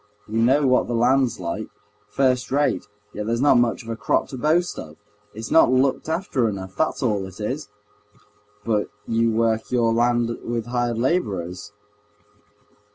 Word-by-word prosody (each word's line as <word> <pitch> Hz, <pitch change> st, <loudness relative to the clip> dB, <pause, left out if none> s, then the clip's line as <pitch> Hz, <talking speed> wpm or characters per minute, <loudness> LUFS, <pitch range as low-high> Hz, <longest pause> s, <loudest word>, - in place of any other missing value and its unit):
We 110 Hz, +1 st, -2 dB
know 135 Hz, +5 st, +4 dB
what 130 Hz, -1 st, +3 dB
the 120 Hz, -, -2 dB
land's 125 Hz, 0 st, +2 dB
like—first 125 Hz, +8 st, -3 dB
rate, 145 Hz, -5 st, +1 dB, 0.3 s
yet 105 Hz, 0 st, -5 dB
there's 115 Hz, +1 st, 0 dB
not 135 Hz, -2 st, +5 dB
much 120 Hz, -1 st, 0 dB
of 115 Hz, -, -11 dB
a 115 Hz, -, -2 dB
crop 105 Hz, -2 st, 0 dB
to 130 Hz, -, -7 dB
boast 165 Hz, +6 st, +1 dB
of. 75 Hz, -1 st, -9 dB, 0.4 s
It's 110 Hz, +1 st, -7 dB
not 160 Hz, -, +6 dB
looked 130 Hz, +4 st, +1 dB
after 160 Hz, -, 0 dB
enough—that's 100 Hz, +10 st, -3 dB
all 105 Hz, -5 st, 0 dB
it 95 Hz, +2 st, -13 dB
is!" 125 Hz, +4 st, -4 dB, 1.0 s
"But 105 Hz, -3 st, 0 dB, 0.2 s
you 115 Hz, 0 st, +1 dB
work 110 Hz, 0 st, 0 dB
your 115 Hz, -2 st, +2 dB
land 120 Hz, 0 st, +1 dB
with 115 Hz, -1 st, -3 dB
hired 120 Hz, -1 st, -1 dB
laborers?" 105 Hz, -, -2 dB
115 Hz, 155 wpm, -23 LUFS, 110-130 Hz, 1.0 s, not